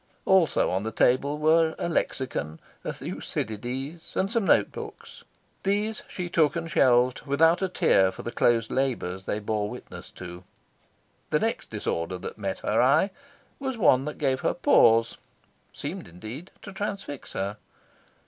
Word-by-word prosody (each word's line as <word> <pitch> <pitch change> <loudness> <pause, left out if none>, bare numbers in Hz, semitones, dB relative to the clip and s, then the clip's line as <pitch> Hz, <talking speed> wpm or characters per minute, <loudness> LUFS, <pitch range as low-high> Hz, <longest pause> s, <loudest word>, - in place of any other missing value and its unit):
Also 185 -6 +3
on 95 - 0
the 110 +2 -3
table 140 +6 +2
were 160 +1 +3
a - - -2
lexicon, 125 - -2 0.2
a - - -2
Thucydides, 130 +9 -5
and 195 +2 0
some 230 -4 +1
note - - +4
books. - - -9 0.4
These 210 +2 0
she 180 -1 -5
took 160 -2 +2
and 165 -1 -3
shelved 125 0 +3
without 165 +5 +4
a 190 - 0
tear 95 - +3
for - - -9
the 120 - -4
closed 115 -2 +2
labours 115 -9 -1
they - - 0
bore 105 0 -2
witness - - -9
to. 90 0 -9 0.9
The - - +2
next - - -2
disorder 85 +2 -2
that 90 - -8
met 100 -2 -3
her 110 - +2
eye 150 +10 +4 0.5
was 265 -3 -3
one 135 - +4
that 150 - -5
gave 135 -3 +1
her - - 0
pause 115 0 +4 0.5
seemed, - - -6
indeed, 110 - -9
to 205 - -9
transfix 195 -8 -5
her. 100 +2 -3
135 Hz, 155 wpm, -26 LUFS, 110-170 Hz, 0.9 s, note